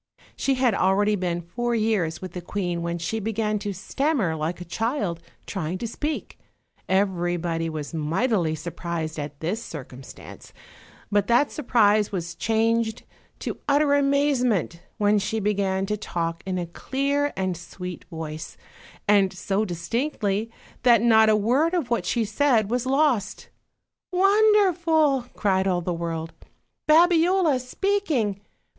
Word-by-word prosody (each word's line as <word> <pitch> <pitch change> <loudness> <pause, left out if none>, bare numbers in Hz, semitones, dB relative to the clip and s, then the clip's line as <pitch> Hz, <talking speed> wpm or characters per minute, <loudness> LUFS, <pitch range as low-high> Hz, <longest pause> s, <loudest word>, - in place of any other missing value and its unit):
She 270 - 0
had 255 -3 +2
already 200 +2 +2
been 175 -3 -2
four 240 +8 -2
years 210 -7 0
with 185 - -6
the 180 - -5
queen 175 -1 -3
when 170 0 -2
she 175 +7 -3
began 215 0 -1
to 205 0 -3
stammer 205 - -1
like 160 +3 -3
a 180 - -7
child 205 - -2 0.2
trying 180 -2 -3
to 230 - -4
speak; 295 +7 -4 0.5
everybody 175 -3 0
was 155 -1 -6
mightily 165 +2 0
surprised 165 -1 -4
at 145 -1 -6
this 185 +8 -2
circumstance, 130 -3 -10 0.6
but 205 -1 +2
that 240 +5 +3
surprise 215 -7 +2
was 175 -3 -4
changed 225 +2 0 0.4
to - - -4
utter 285 0 +4
amazement 275 - +1 0.2
when 205 0 +3
she 215 +3 -2
began 195 -2 0
to 210 +2 -1
talk 170 -5 -3
in 185 -1 -1
a 175 - -2
clear 280 +10 -1
and 185 -1 -1
sweet 180 +1 -8
voice, 160 -2 -7 0.5
and 200 -2 +4
so 195 +3 -1
dis 170 -3 -6
tinctly 230 -5 -1 0.3
that 235 -3 +5
not 220 -2 +6
a 215 - +5
word 260 - +2
of 290 -9 -2
what 235 - 0
she 235 -2 +1
said 220 -1 +2
was 250 +1 0
lost. 265 -7 +1 0.6
"Won 400 +4 +4
derful!" 325 - +3
cried 190 -1 +1
all 180 -2 +1
the 175 +1 -2
world; 165 -1 -4 0.6
"Babiola 340 -2 +4
speaking! 255 - -1
205 Hz, 140 wpm, -24 LUFS, 175-255 Hz, 0.6 s, not